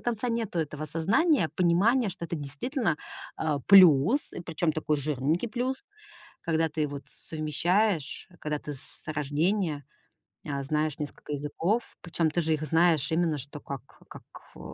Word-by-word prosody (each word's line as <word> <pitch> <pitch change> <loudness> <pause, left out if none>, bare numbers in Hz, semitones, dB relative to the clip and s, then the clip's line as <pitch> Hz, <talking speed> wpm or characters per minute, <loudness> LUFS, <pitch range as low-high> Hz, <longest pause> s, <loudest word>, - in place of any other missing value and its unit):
конца 240 0 -2
нету 225 -6 -2
этого 155 -2 -3
осознания, 200 - +2
понимания, 200 +8 +3
что 175 - -7
это 170 - -3
действительно, 155 - -2 0.4
а, 155 -2 0
плюс, 185 - +6
и - - -6
причём 165 -1 -1
такой 155 -1 0
жирненький 150 - 0
плюс, 255 - -2 0.6
когда 165 -1 +1
ты 150 -1 -1
вот 140 -1 -6
совмещаешь, 165 +3 -1
когда 150 -1 -2
ты 145 0 -6
с 130 - -17
рождения, 155 +2 0 0.6
а, 140 -2 -2
знаешь 150 +1 -1
несколько 150 0 -6
языков. 165 +10 -1
Причём 165 -2 0
ты 175 - 0
же 160 0 +1
их 155 0 -3
знаешь 160 -2 +3
именно 165 -2 +1
что 145 +2 -7
как 140 -1 -6 0.3
как, - - -10 0.3
а, - - -12
160 Hz, 150 wpm, -28 LUFS, 150-190 Hz, 0.6 s, плюс